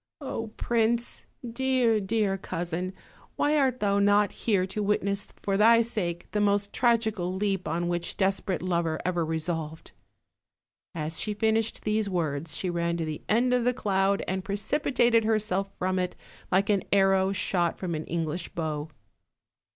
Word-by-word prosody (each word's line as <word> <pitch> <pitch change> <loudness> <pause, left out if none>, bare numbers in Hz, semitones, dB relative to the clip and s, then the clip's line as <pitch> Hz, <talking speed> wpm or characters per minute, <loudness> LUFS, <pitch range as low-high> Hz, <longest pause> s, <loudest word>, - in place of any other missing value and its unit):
Oh, 245 -6 -4
prince! 235 0 0 0.2
dear, 245 -2 +2
dear 205 -1 0
cousin, 175 -1 -3 0.4
why 295 +1 +2
art 265 -4 +2
thou 200 -1 +2
not 205 0 +4
here 200 -5 +1
to 195 +3 -4
witness 200 -1 0 0.2
for 195 -1 +1
thy 230 +2 +6
sake 185 -7 -3
the 210 - 0
most 205 0 +1
tragical 220 -7 +1
leap 195 -1 -1
on 170 +2 -1
which 175 0 -2
desperate 195 -2 0
lover 170 -3 0
ever 175 -2 +1
resolved?" 160 0 -3 1.0
As 160 0 -3
she 210 -1 -2
finished 220 +1 0
these 215 -1 0
words 160 -4 -2
she 185 - -2
ran 170 -1 -1
to 165 - -2
the 155 -1 -5
end 245 +3 +3
of 250 -1 +2
the 250 +1 +1
cloud 195 -3 +1
and 190 0 -2
precipi 205 +10 -1
tated 235 -3 +4
herself 215 -3 0
from 185 0 0
it, 180 0 -2 0.4
like 195 +3 +3
an 200 -2 +2
arrow 195 -1 +4
shot 180 -3 0
from 180 -3 -3
an 155 0 -3
English 165 +1 -3
bow. 155 -2 -3
195 Hz, 160 wpm, -27 LUFS, 175-220 Hz, 1.0 s, thy